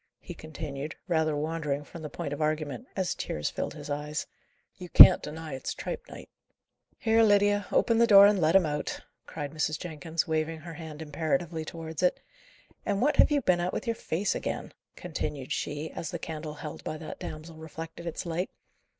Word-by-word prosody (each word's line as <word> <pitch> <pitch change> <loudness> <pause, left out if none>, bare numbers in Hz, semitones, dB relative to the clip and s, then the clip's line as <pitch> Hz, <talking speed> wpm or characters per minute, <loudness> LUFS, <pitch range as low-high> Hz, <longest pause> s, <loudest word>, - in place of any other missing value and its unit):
he 175 - -8
continued, 155 -2 -6
rather 160 -3 +2
wandering 150 -2 -2
from 165 +3 -10
the 150 - -5
point 145 - -4
of 145 - -5
argument, 155 - -1
as 190 -2 0
tears 75 - -3
filled - - -4
his - - -8
eyes. 150 +1 -3 0.5
"You 180 -1 -8
can't - - +10
deny 155 0 -6
as 130 - -5
it's - - -3
tripe 485 0 -5
night." - - -10 0.7
"Here, 225 0 +3
Lydia, 205 -2 +4
open 230 -1 +3
the 235 - +6
door 200 -2 +10
and 205 -2 +4
let 160 +2 +3
him 190 -3 +6
out," 150 -1 -3 0.3
cried 145 -3 -5
Mrs. 155 0 -1
Jenkins, 160 -1 -3
waving 160 0 -1
her 165 +1 -8
hand 160 -1 -8
imperatively 160 +2 -1
towards 160 0 -6
it. 180 - +2 0.6
"And 200 -1 0
what 290 +6 +2
have - - +7
you 290 -1 +2
been 180 -4 +3
at 175 +1 -1
with - - -3
your 230 -1 0
face 195 0 -1
again?" - - -4 0.2
continued 150 -6 -4
she, 150 +2 -3
as 160 - -5
the 170 - -3
candle 155 -2 -6
held 150 0 -7
by 155 - -4
that 155 - -8
damsel 155 +1 -7
reflected 160 +2 -8
its 170 - -4
light. 175 +2 -2
160 Hz, 195 wpm, -29 LUFS, 150-180 Hz, 0.7 s, can't